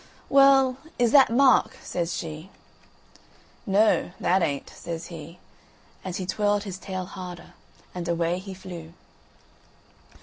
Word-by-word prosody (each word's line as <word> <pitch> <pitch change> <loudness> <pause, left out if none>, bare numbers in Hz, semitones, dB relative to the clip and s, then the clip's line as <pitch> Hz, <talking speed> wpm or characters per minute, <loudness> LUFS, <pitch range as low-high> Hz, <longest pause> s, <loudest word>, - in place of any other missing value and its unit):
"Well, 270 -2 +5 0.2
is 240 -2 +2
that 275 -1 +7
Mark?" 255 +3 +4
says 170 -1 -3
she. 160 +2 -7 1.2
"Noo, 205 0 +3
that 185 +2 +2
ain't," 140 -4 -2
says 165 -1 -6
he, 165 +2 -9 0.7
and 185 -2 -5
he 185 - -3
twirled 205 +2 0
his 190 -3 -7
tail 185 -2 -5
harder, 180 -2 -9 0.4
and 175 -1 -5
away 170 +1 0
he 190 0 -8
flew. 175 -3 -9
185 Hz, 125 wpm, -25 LUFS, 170-210 Hz, 1.2 s, that